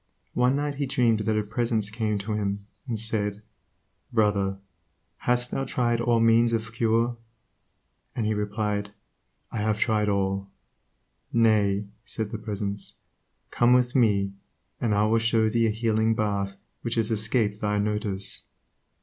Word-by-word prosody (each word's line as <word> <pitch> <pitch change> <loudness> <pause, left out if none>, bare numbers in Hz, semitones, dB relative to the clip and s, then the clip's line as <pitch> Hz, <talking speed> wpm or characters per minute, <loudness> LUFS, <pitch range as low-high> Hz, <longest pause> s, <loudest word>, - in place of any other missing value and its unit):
One 125 +2 +3
night 145 0 -1
he 140 -1 -1
dreamed 120 -4 +2
that 110 0 0
a 105 - +1
Presence 110 -1 -1
came 110 -2 -1
to 100 +2 -3
him 100 -1 -2 0.2
and 115 -3 -2
said, 105 -2 -1 0.7
"Brother, 105 -4 +2 0.7
hast 125 0 +2
thou 135 - -1
tried 120 -3 0
all 120 0 +3
the 115 - +3
means 115 +1 +4
of 110 0 -2
cure?" 115 +1 +1 1.0
and 115 - -1
he 110 - +1
replied, 105 -1 -2 0.6
"I - - -3
have 105 0 +1
tried 105 -2 +2
all." 100 0 0 0.8
"Nay," 105 -3 +3 0.2
said 110 -2 -4
the - - -4
Presence, 100 -2 -4 0.6
"Come 120 +1 +4
with 125 -1 +3
me, 100 -6 +3 0.5
and 110 -4 +1
I 105 +1 +3
will 115 +1 +3
show 115 -1 +2
thee 115 +1 +2
a - - +2
healing 110 0 +1
bath 100 -2 -1 0.3
which 115 -1 -2
has 115 -1 0
escaped 110 -1 0
thy 105 -1 +1
notice." 105 -2 -2
110 Hz, 150 wpm, -26 LUFS, 105-115 Hz, 1.0 s, means